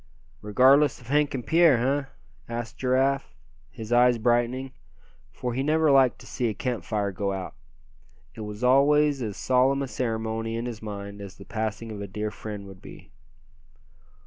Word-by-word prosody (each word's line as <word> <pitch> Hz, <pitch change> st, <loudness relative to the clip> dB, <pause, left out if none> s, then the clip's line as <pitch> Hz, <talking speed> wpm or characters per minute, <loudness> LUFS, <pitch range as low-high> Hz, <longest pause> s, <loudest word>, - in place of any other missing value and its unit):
"Regardless 130 Hz, +7 st, +4 dB
of 120 Hz, -1 st, -15 dB
Hank 145 Hz, 0 st, +2 dB
and 125 Hz, -, -5 dB
Pierre, 165 Hz, -5 st, +5 dB
eh?" 135 Hz, +4 st, 0 dB, 0.5 s
asked 115 Hz, -1 st, -5 dB
Giraffe, 130 Hz, -, +1 dB, 0.3 s
his 110 Hz, -, -6 dB
eyes 120 Hz, 0 st, +5 dB
brightening; 120 Hz, +3 st, 0 dB, 0.6 s
for 125 Hz, -2 st, -4 dB
he 130 Hz, -, -1 dB
never 155 Hz, +1 st, +3 dB
liked 135 Hz, -2 st, +4 dB
to -, -, -13 dB
see 125 Hz, -, -2 dB
a 110 Hz, -, -2 dB
camp 120 Hz, -4 st, -3 dB
fire 100 Hz, 0 st, -1 dB
go 100 Hz, +1 st, -2 dB
out; 95 Hz, -1 st, -5 dB, 0.8 s
it -, -, -9 dB
was 105 Hz, +2 st, -7 dB
always 140 Hz, +2 st, +4 dB
as 105 Hz, -4 st, -4 dB
solemn 130 Hz, +2 st, +2 dB
a -, -, -4 dB
ceremony 115 Hz, -2 st, -3 dB
in 115 Hz, +1 st, -3 dB
his 115 Hz, -3 st, -6 dB
mind 100 Hz, -1 st, -7 dB
as 100 Hz, -1 st, -9 dB
the 100 Hz, -, -12 dB
passing 110 Hz, +1 st, -4 dB
of 105 Hz, -1 st, -7 dB
a 100 Hz, -, -5 dB
dear 105 Hz, +2 st, -4 dB
friend 105 Hz, -2 st, -7 dB
would 95 Hz, -1 st, -13 dB
be. -, -, -13 dB
120 Hz, 170 wpm, -26 LUFS, 105-135 Hz, 0.8 s, Pierre